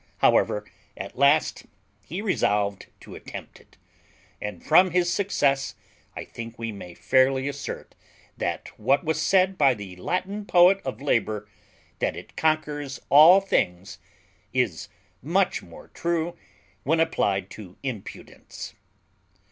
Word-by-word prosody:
However, 105 0 +3 0.3
at 95 - -7
last 140 +4 +2 0.3
he 180 +7 -6
resolved 100 - 0
to - - -12
attempt - - -9
it, - - -24 0.6
and 105 0 -6
from 180 +4 +6
his 175 0 +1
success 140 -9 0 0.4
I - - -6
think 115 0 -9
we 115 -1 -4
may 90 -4 -10
fairly 130 +1 +2
assert 140 0 -6 0.4
that - - -3
what 135 +6 +2
was 160 0 -1
said 190 +2 +2
by 135 -3 +5
the 100 -4 -9
Latin 185 - -3
poet 180 +2 +5
of 130 0 -5
labour, 110 -6 0 0.5
that - - 0
it - - -11
conquers 150 -4 -1
all 165 +7 +8
things, 90 - -1 0.5
is 120 - -1 0.3
much - - +1
more - - -14
true 170 0 -2 0.5
when 160 +3 +1
applied 100 - 0
to 95 -4 -11
impudence. 125 -7 -8
140 Hz, 125 wpm, -25 LUFS, 105-170 Hz, 0.6 s, all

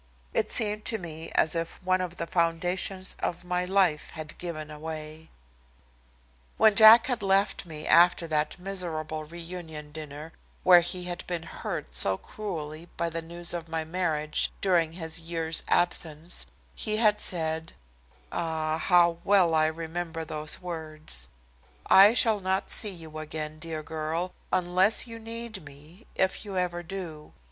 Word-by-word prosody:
It - - 0
seemed 210 -1 +5
to 225 - +3
me 165 -3 -7
as 155 - +3
if 165 -1 -4
one 185 0 +1
of 175 -1 -5
the 170 - -3
foundations 175 +3 +1
of 175 +1 -4
my 180 0 -1
life 185 -5 +2
had 155 -1 -7
given 155 -3 -5
away. 155 +1 -7 1.3
When 220 -1 +5
Jack 220 +2 +9
had 250 -4 -2
left 195 -1 +1
me 155 -1 -7
after 175 0 +5
that 155 0 -1
miserable 165 -5 -2
reunion 165 -2 -8
dinner 155 +1 -9 0.3
where 180 -1 +8
he 175 +1 -1
had 175 0 -5
been 175 -2 -3
hurt - - -6
so 95 +11 +3
cruelly 165 - -7
by 170 0 -1
the 165 0 -2
news 170 +1 -2
of 170 -1 -5
my 160 -1 -3
marriage 160 -3 -1
during 170 -4 +1
his 165 -2 -2
year's 165 -1 -2
absence, 165 -1 -1 0.3
he 215 -1 -2
had 210 -2 +3
said 160 -2 -3 0.6
ah, 160 -1 -2
how 170 -1 +3
well 190 -4 +4
I 155 0 +3
remembered 165 0 -5
the 155 0 +2
words 155 - -6 0.6
"I 200 +4 +7
shall 220 -4 +5
not 190 0 -1
see 215 - +6
you 160 -4 -7
again, 155 0 -5
dear 160 -1 -5
girl, 160 +3 -4 0.2
unless 185 +5 +2
you 230 -1 -9
need 230 -3 -4
me, 150 +8 -14
if 190 0 0
you 200 -3 -6
ever 175 -1 -1
do. 165 -4 -8
170 Hz, 150 wpm, -27 LUFS, 155-185 Hz, 1.3 s, Jack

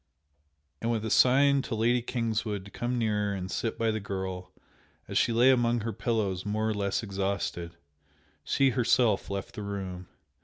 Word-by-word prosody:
And 115 - -1
with 115 -2 -1
a 110 - -2
sign 140 +2 +5
to 130 - -4
Lady 120 +3 +2
Kingswood 110 -4 -2
to 100 - -12
come 120 +1 -2
nearer 105 -3 0
and 95 -1 -5
sit 115 - -2
by 115 -1 +1
the 110 - -2
girl 95 -2 -5 0.6
as - - -7
she - - +3
lay 120 +3 +5
among 120 -2 +2
her 115 +1 -3
pillows 100 -3 -1
more 110 +2 -1
or 110 - +1
less 100 +1 -1
exhausted, 95 -4 -3 0.7
she 135 -1 +2
herself 120 -3 +2
left 100 +2 -4
the 115 - -6
room. 95 -3 -5
110 Hz, 170 wpm, -28 LUFS, 100-120 Hz, 0.7 s, sign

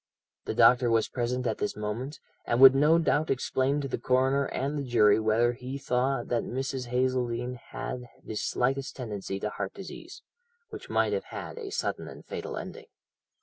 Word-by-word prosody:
The - - -3
doctor 125 -1 +6
was 115 -1 +2
present 125 +1 -2
at 110 -2 -1
this - - -2
moment, 115 +7 -4 0.3
and 120 - +1
would 135 0 +10
no 150 +4 +5
doubt 155 -2 +1
explain 135 +2 0
to 140 - -3
the - - -3
coroner 130 +2 +2
and 140 +3 -2
the 145 - -1
jury 110 -5 +4
whether 110 +2 +2
he 130 +2 -6
thought 135 0 0
that 120 -1 +1
Mrs. 130 0 -3
Hazeldene 125 -1 -1
had 125 -2 -5 0.2
the - - -5
slightest 130 +5 -1
tendency 105 -6 -5
to 105 +1 -3
heart 100 -2 -5
disease, 260 - -10 0.5
which 425 - -9
might - - +2
have - - -2
had - - -7
a 425 -4 -6
sudden 445 +4 -3
and - - -11
fatal - - -5
ending. - - -8
125 Hz, 180 wpm, -28 LUFS, 120-135 Hz, 0.5 s, would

